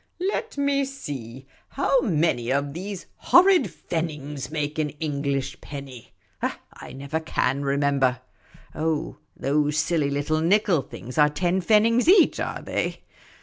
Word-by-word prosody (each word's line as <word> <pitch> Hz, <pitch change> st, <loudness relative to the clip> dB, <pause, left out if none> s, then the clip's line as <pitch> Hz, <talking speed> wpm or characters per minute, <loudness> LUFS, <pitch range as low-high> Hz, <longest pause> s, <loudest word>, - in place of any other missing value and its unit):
" -, -, -45 dB
Let 450 Hz, -9 st, -4 dB
me 280 Hz, 0 st, +2 dB
see, 135 Hz, -, -7 dB, 0.2 s
how 275 Hz, -1 st, +2 dB
many 155 Hz, -, +1 dB
of 140 Hz, +1 st, 0 dB
these 190 Hz, +3 st, -6 dB
horrid 365 Hz, 0 st, +5 dB
pfennigs 150 Hz, -5 st, -4 dB
make 150 Hz, 0 st, -3 dB
an 150 Hz, -1 st, 0 dB
English 140 Hz, -3 st, -2 dB
penny? 135 Hz, -5 st, -9 dB, 0.3 s
I -, -, -6 dB
never 140 Hz, +4 st, -3 dB
ca7i 140 Hz, -3 st, -1 dB
remember. 140 Hz, -2 st, +1 dB, 0.5 s
Oh, 155 Hz, -3 st, -2 dB, 0.2 s
those 150 Hz, +2 st, +1 dB
silly 155 Hz, -2 st, +1 dB
little 145 Hz, +3 st, 0 dB
nickel 180 Hz, -2 st, +3 dB
things 125 Hz, +2 st, -7 dB
are 150 Hz, 0 st, +6 dB
ten 175 Hz, +4 st, 0 dB
pfennigs 225 Hz, -, +3 dB
each, 370 Hz, -1 st, +6 dB
are -, -, -3 dB
they -, -, -3 dB
150 Hz, 135 wpm, -24 LUFS, 140-185 Hz, 0.5 s, are